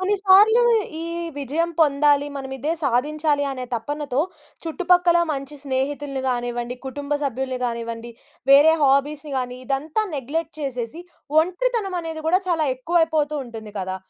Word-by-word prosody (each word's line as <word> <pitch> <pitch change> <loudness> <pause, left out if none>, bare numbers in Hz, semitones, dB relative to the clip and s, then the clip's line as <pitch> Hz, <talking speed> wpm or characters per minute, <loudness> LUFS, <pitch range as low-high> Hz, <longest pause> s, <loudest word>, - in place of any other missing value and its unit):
కొన్నిసార్లు 405 +4 +5 0.4
ఈ 330 - -4 0.3
విజయం 310 +5 -1
పొందాలి. 290 -1 +4
మనం 265 -1 -6
ఇదే 290 +5 -2
సాధించాలి 290 +3 +1
అనే 255 -1 -5
తపనతో 285 +3 -2 0.4
చుట్టుపక్కల 355 +1 +3
మంచి 275 0 -4
స్నేహితుల్ని 275 +1 -2
గానివ్వండి, 240 0 -2
కుటుంబ 285 +2 -5
సభ్యుల్ని 260 -1 -2
గానివ్వండి, 235 0 -4 0.4
వేరే 290 +3 +8
హాబీస్‌ని 285 +2 +1
గాని 250 -1 -3
ఇదంతా 295 - -1
నెగ్లెక్ట్ 295 +4 -3
చేసేసి 255 +2 -4 0.4
ఒంటరితనమనేది 360 -4 -2
గూడా 365 +3 +3
చాలా 320 -3 +1
ఎక్కువైపోతూ 315 +1 +1
ఉంటుంది 220 -3 -9
కదా! 190 0 -3
290 Hz, 120 wpm, -22 LUFS, 260-325 Hz, 0.4 s, వేరే